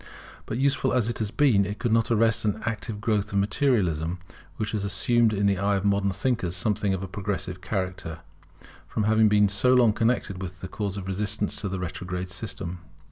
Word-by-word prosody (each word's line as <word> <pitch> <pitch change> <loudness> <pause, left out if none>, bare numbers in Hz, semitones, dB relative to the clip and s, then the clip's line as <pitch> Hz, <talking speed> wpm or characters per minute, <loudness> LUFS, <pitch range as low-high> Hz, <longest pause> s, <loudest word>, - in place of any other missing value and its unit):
But 110 - -3
useful 135 0 +1
as 120 -3 +2
it 120 - -2
has 110 -2 -1
been, 120 -5 +3
it 100 +2 -4
could 120 - -1
not 115 +2 +2
arrest 115 -1 +3
the 105 0 0
active 110 -1 -3
growth 105 -1 0
of - - +1
Materialism, 100 - +1 0.4
which 105 - -2
has 105 -3 -2
assumed 115 +3 +2
in 100 -1 0
the 100 -2 +2
eyes 100 0 +2
of 95 - -3
modern 100 -1 +2
thinkers 95 -2 -1
something 105 +1 +1
of 95 - -5
a - - -4
progressive 95 -1 -4
character, 90 -4 -4 0.7
from 110 - -2
having 110 0 +4
been 105 0 +5
so 105 +6 +3
long 120 -4 +5
connected 110 -5 0
with 90 -1 -7
the 95 - -5
cause 100 0 -4
of 95 -1 -6
resistance 105 +2 -1
to 100 - -3
a 95 - -2
retrograde 90 0 -5
system. 95 -4 -4
100 Hz, 200 wpm, -26 LUFS, 95-110 Hz, 0.7 s, been